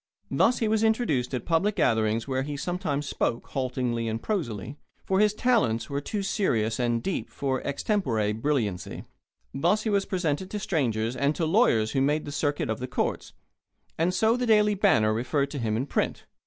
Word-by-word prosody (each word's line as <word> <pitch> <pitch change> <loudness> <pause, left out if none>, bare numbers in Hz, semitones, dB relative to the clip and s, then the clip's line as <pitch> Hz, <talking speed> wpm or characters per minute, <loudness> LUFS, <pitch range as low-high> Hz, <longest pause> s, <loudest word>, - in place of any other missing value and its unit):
Thus 245 - +3
was 220 -1 +2
he 225 - +4
introduced 190 - 0
at 125 - -4
public 185 +5 +1
gatherings 110 +1 +1
where 130 -1 0
he 145 +1 -4
sometimes 150 -3 -2
spoke, 115 - -2
haltingly 125 -3 -2
and 110 0 -2
prosily, 135 - -3 0.3
for 190 0 +1
his 210 0 +3
talents 215 - +1
were 140 0 -1
too 205 +6 -3
serious 115 - 0
and 120 -1 0
deep 195 - -2
for 135 -2 -2
extempore 135 - 0
brilliancy; 110 -6 -2 0.5
thus 175 +10 +1
was 200 -2 +2
he - - -26
presented 180 -1 -1
to 210 - -4
strangers 120 - -1
and 140 +3 +1
to 170 - -2
the - - +1
lawyers 140 - +3
who 135 - +1
made 150 +3 +1
the 145 - -6
circuit 145 0 -1
of 110 -1 -2
the 125 - -4
courts; 125 - -2 0.6
and 165 +3 +1
so 220 +5 +2
the 250 0 -1
Daily 210 -1 +4
Banner 150 - +3
referred 140 +5 -1
to 145 - -4
him 110 -2 -1
in 125 - -1
print. - - -2
145 Hz, 190 wpm, -27 LUFS, 115-195 Hz, 0.6 s, he